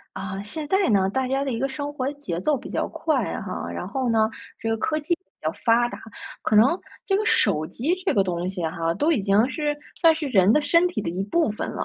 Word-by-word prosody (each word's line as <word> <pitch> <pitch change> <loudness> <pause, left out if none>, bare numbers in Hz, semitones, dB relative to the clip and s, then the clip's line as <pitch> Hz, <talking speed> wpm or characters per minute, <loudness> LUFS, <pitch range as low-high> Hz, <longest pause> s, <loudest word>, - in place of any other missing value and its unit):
啊， 195 0 -4
现 300 +9 -5
在 385 +2 +3
呢， 195 -3 +3
大 260 +5 -1
家 270 +2 0
的 270 - -2
一 230 - -2
个 270 - +1
生 285 +2 -4
活 265 -1 -2
节 190 -13 -5
奏 295 +11 +1
比 - - -8
较 - - -1
快 315 - -1
哈， - - -5
然 - - -5
后 260 -3 -2
呢， 220 -1 +3 0.3
这 225 - -3
个 225 - 0
科 310 +7 0
技 310 +3 0
比 345 - -5 0.2
较 155 - -1
发 235 +1 +4
达， - - -8 0.4
可 215 - +1
能 265 - +5 0.3
这 390 -1 +2
个 430 - -1
手 155 - +2
机 285 - -1
这 - - +2
个 200 - +3
东 175 -1 -2
西 185 -2 -5
哈， 165 0 -1
都 300 - +1
已 255 - +2
经 205 +5 +3
是 295 +1 -1 0.2
算 325 -2 +6
是 315 - -4
人 200 -3 +5
的 300 - +4
身 335 +4 +4
体 355 - -3
的 - - -3
一 180 +3 -3
部 320 +3 +1
分 210 - -4
了。 - - -3
250 Hz, 275 characters per minute, -24 LUFS, 195-300 Hz, 0.4 s, 算